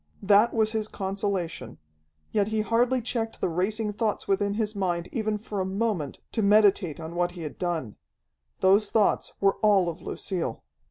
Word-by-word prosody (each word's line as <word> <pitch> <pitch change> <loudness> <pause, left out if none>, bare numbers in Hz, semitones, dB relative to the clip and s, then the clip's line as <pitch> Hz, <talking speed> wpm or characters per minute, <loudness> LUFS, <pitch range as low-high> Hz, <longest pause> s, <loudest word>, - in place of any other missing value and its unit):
That 205 +4 +5
was 220 -1 +1
his 220 -1 -1
consolation. 190 - -3 0.5
Yet 205 -2 +1
he 220 0 0
hardly 240 +3 +1
checked 225 -1 -3
the - - 0
racing 210 +5 -1
thoughts 215 0 -2
within 200 +1 +1
his 215 -1 -1
mind 175 -3 -1
even 215 -2 -1
for 210 -1 -5
a - - +1
moment, 190 -6 -2
to 225 - -1
meditate 200 -6 +4
on 160 +1 -7
what 175 0 0
he 175 -2 -7
had 150 - -7
done. 165 - -3 0.6
Those 200 +2 +4
thoughts 215 -2 +1
were 195 0 +2
all 200 -5 +4
of 165 +1 -7
Lucille. 170 -11 -3
200 Hz, 170 wpm, -26 LUFS, 180-215 Hz, 0.6 s, That